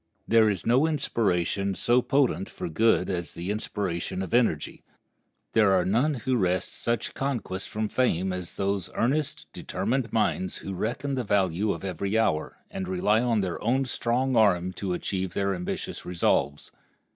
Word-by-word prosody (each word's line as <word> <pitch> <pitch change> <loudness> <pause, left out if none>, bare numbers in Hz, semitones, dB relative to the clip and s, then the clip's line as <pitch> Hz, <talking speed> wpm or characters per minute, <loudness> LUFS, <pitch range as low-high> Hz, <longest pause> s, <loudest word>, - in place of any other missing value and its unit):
There 110 -1 +5
is 100 -4 -2
no 130 +7 +4
inspiration 100 - 0
so 120 +5 +3
potent 130 -9 +1
for - - -5
good 90 +2 +3
as 85 -4 -3
the 90 +4 -3
inspiration 95 -3 -3
of 95 - -7
energy. 115 -11 +1 0.7
There 105 -3 +5
are 90 -2 +3
none 125 +11 +2
who 130 +1 0
wrest 90 -3 0
such 115 -1 -2
conquests 120 -9 -3
from 110 0 -2
fame 95 -6 +1
as 90 -2 -6
those 100 -2 -1
earnest, 150 +5 0
determined 125 -1 -2
minds, 95 -4 0
who 95 - -4
reckon 120 +9 -2
the 130 -2 -1
value 100 -1 +1
of - - -5
every 95 +3 -1
hour, 80 -9 0
and 95 - -4
rely 100 +4 +2
on 115 -3 +2
their 90 -3 -3
own 130 +5 +2
strong 125 +1 0
arm 95 -5 +3
to 95 -1 -3
achieve 95 0 -3
their 100 0 +1
ambitious 90 -1 -4
resolves. 85 -4 0
100 Hz, 160 wpm, -27 LUFS, 90-120 Hz, 0.7 s, There